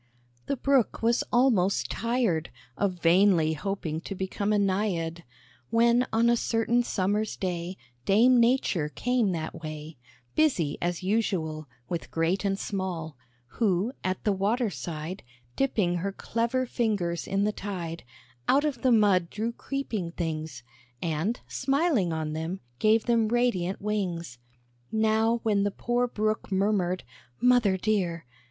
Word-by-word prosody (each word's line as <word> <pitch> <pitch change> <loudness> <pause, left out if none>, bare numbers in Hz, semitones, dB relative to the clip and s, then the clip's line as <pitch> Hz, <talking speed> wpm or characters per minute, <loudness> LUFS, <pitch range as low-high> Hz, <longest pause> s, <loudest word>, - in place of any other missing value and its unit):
The 280 - -1
Brook 270 -4 +1
was 235 +1 +3
almost 235 -7 +3
tired 230 -9 0 0.3
Of 200 -2 0
vainly 170 -2 +4
hoping 160 -1 -3
to 195 - -6
become 190 +2 -2
a - - +3
Naïad; 185 -4 0 0.5
When 235 +2 +3
on 230 +1 +3
a 235 - +5
certain 230 +1 +1
Summer's 210 -1 -1
day, 180 -1 -3 0.3
Dame 240 - +5
Nature 230 - +2
came 240 +3 +1
that 165 0 -5
way, 155 -1 -7 0.4
Busy 185 - +1
as 175 0 -2
usual, 175 -7 -1 0.2
With 170 - -4
great 165 +4 0
and 195 -1 0
small; 180 -7 -4 0.4
Who, 210 +1 +2
at 185 0 -2
the 210 - +2
water 210 +4 0
side 160 +5 -5 0.3
Dipping 205 -10 +1
her 195 +3 -2
clever 235 +5 -1
fingers 205 -9 -1
in 195 +1 +1
the 210 - +2
tide, 175 -5 -5 0.4
Out 285 +3 +4
of 270 -6 -2
the 260 - +3
mud 200 -6 +4
drew 220 +2 -2
creeping 230 -9 -4
things, 155 -6 -4 0.4
And, 170 - -1
smiling 275 - +1
on 155 -1 -2
them, 160 +4 -4 0.2
gave 220 +1 +3
them 230 -2 +3
radiant 220 -6 +1
wings. 180 - -3 0.5
Now 220 +1 +2
when 210 -3 +2
the 205 - +2
poor 240 +4 0
Brook 215 -2 -2
murmured, 190 -2 +1 0.4
"Mother 245 -6 +4
dear!" 180 -6 -1
200 Hz, 135 wpm, -27 LUFS, 170-230 Hz, 0.5 s, a